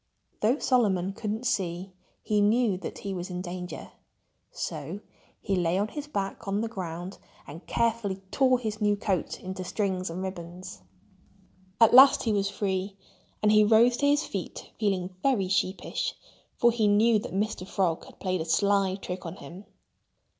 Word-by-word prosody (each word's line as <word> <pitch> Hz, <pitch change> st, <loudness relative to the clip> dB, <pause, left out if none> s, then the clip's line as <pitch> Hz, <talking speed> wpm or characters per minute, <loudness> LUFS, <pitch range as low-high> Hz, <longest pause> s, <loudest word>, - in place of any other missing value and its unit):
Though 230 Hz, +6 st, +3 dB
Solomon 195 Hz, -9 st, +1 dB
couldn't 220 Hz, +3 st, -4 dB
see, 185 Hz, -5 st, -1 dB, 0.3 s
he 210 Hz, -1 st, +1 dB
knew 215 Hz, 0 st, +3 dB
that 190 Hz, -, -7 dB
he 195 Hz, -, -5 dB
was 180 Hz, 0 st, -5 dB
in 180 Hz, -1 st, -4 dB
danger. 180 Hz, 0 st, -7 dB, 0.6 s
So 170 Hz, +9 st, -5 dB, 0.4 s
he 200 Hz, -, -1 dB
lay 175 Hz, 0 st, +1 dB
on 205 Hz, +2 st, 0 dB
his 295 Hz, +2 st, -6 dB
back 200 Hz, -8 st, -4 dB
on 200 Hz, +2 st, 0 dB
the 230 Hz, -, -1 dB
ground 180 Hz, -3 st, -6 dB, 0.3 s
and 160 Hz, +5 st, -11 dB
carefully 230 Hz, -4 st, 0 dB, 0.2 s
tore 255 Hz, -2 st, +4 dB
his 215 Hz, -3 st, -4 dB
new 205 Hz, 0 st, +3 dB
coat 195 Hz, -4 st, -2 dB
into 185 Hz, 0 st, -6 dB
strings 185 Hz, -1 st, -2 dB
and 180 Hz, +3 st, -5 dB
ribbons. 175 Hz, -, -7 dB, 1.0 s
At 230 Hz, -1 st, +6 dB
last 265 Hz, +2 st, +8 dB
he 225 Hz, -, +1 dB
was 200 Hz, -1 st, +1 dB
free. 195 Hz, -1 st, -2 dB, 0.5 s
And 210 Hz, -, +5 dB
he 215 Hz, 0 st, +6 dB
rose 230 Hz, +3 st, +5 dB
to 285 Hz, -, +2 dB
his 290 Hz, +1 st, +3 dB
feet 195 Hz, -4 st, -6 dB
feeling 190 Hz, -4 st, -1 dB
very 245 Hz, -9 st, +2 dB
sheepish, 190 Hz, 0 st, -1 dB, 0.4 s
for 240 Hz, -, +5 dB
he 225 Hz, -2 st, +1 dB
knew 215 Hz, +2 st, +4 dB
that 205 Hz, -3 st, -7 dB
Mr. 200 Hz, -2 st, -2 dB
Frog 180 Hz, -5 st, 0 dB
had -, -, -16 dB
played 185 Hz, -2 st, -1 dB
a -, -, -3 dB
sly 195 Hz, +2 st, +2 dB
trick 185 Hz, -2 st, -6 dB
on 165 Hz, +1 st, -6 dB
him. 175 Hz, +6 st, -11 dB
195 Hz, 170 wpm, -27 LUFS, 185-220 Hz, 1.0 s, last